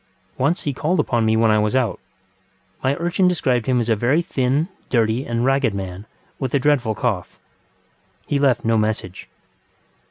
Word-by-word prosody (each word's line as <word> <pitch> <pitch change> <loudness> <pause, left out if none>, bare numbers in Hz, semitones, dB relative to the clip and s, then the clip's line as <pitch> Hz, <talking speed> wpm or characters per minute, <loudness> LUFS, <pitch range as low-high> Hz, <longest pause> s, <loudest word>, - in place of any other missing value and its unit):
Once 145 +7 0
he 145 - -2
called 155 +6 0
upon 120 -6 +1
me 110 0 +2
when 110 -1 +4
I 105 - +3
was 105 +3 0
out. 125 -5 0 0.8
My 135 +1 +2
urchin 175 +3 +1
described 130 -9 0
him 125 -1 +2
as 115 - -1
a 115 - +3
very 130 +10 +1
thin, 140 -1 0 0.2
dirty, 115 +2 +1
and 120 0 -1
ragged 135 -5 +2
man, 95 +1 -6 0.3
with 130 -1 -2
a - - +3
dreadful 130 -6 +1
cough. 105 -6 -2 0.9
He 145 - 0
left 135 -5 +2
no 115 -1 +3
message. 105 -4 -3
125 Hz, 170 wpm, -21 LUFS, 110-140 Hz, 0.9 s, when